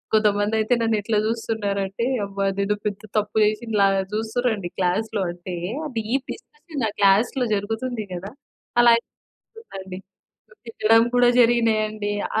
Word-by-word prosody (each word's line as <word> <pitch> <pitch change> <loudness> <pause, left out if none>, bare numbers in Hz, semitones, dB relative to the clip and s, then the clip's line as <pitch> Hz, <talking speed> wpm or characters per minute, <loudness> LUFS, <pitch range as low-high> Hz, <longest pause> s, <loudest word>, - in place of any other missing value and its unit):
కొంతమందయితే 215 +2 +2
నన్నెట్లా 220 -1 0
జూస్తున్నారు 220 -3 -2
అంటే, 205 +5 -3 0.2
అబ్బా! 200 0 -3
నేను 200 +1 +1
పెద్ద 205 -2 -2 0.2
తప్పు 210 +1 -1
జేశిన 220 +2 -2
లాగా 195 -1 +3
జూస్తురండి 220 -3 -1
క్లాస్‌లో 200 +3 0
అంటే 175 +1 -7 0.3
ఆ - - -2
డీప్ 240 +5 -1
డిస్క‌షన్ 300 -5 -7
ఆ - - -6
క్లాస్‌లో 215 +6 +3
జరుగుతుంది 225 +3 -3
గదా! 190 +3 -6 0.5
అలా 240 - +7 0.4
అయిపోతుందండి. 190 - -10 0.5
సో, - - -22
తిట్టడం 225 0 +3
కూడా 245 0 +5
జరిగినాయండి. 215 -3 +2 0.3
ఆ - - +4
215 Hz, 130 wpm, -23 LUFS, 200-230 Hz, 0.5 s, అలా